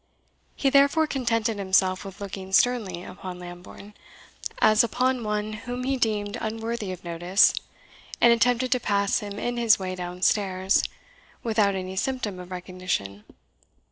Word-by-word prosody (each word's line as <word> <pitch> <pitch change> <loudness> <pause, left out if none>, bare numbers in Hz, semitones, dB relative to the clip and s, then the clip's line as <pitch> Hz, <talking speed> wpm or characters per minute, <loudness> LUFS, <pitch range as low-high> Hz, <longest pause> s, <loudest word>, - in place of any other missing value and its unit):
He 275 - +1
therefore 280 +3 +5
contented 230 -6 -1
himself 190 -1 +2
with 195 -1 -10
looking 195 -1 -7
sternly 205 -7 +2
upon 185 0 -8
Lambourne, 180 +3 -11 0.6
as 215 +1 +5
upon 250 +2 0
one 210 0 -2
whom 245 +3 -5
he 270 +1 0
deemed 215 -3 -1
unworthy 225 -2 -3
of 185 -1 -8
notice, 175 +3 +3 0.7
and 235 0 +7
attempted 245 +2 +2
to 250 - +3
pass 200 -3 +1
him 205 -1 -7
in 240 +2 -2
his 230 -2 +5
way 185 -1 -4
downstairs, 185 +2 +1 0.6
without 215 -4 +2
any 185 0 -4
symptom 215 -4 -2
of 180 0 -9
recognition. 180 - -4
205 Hz, 140 wpm, -25 LUFS, 185-235 Hz, 0.7 s, and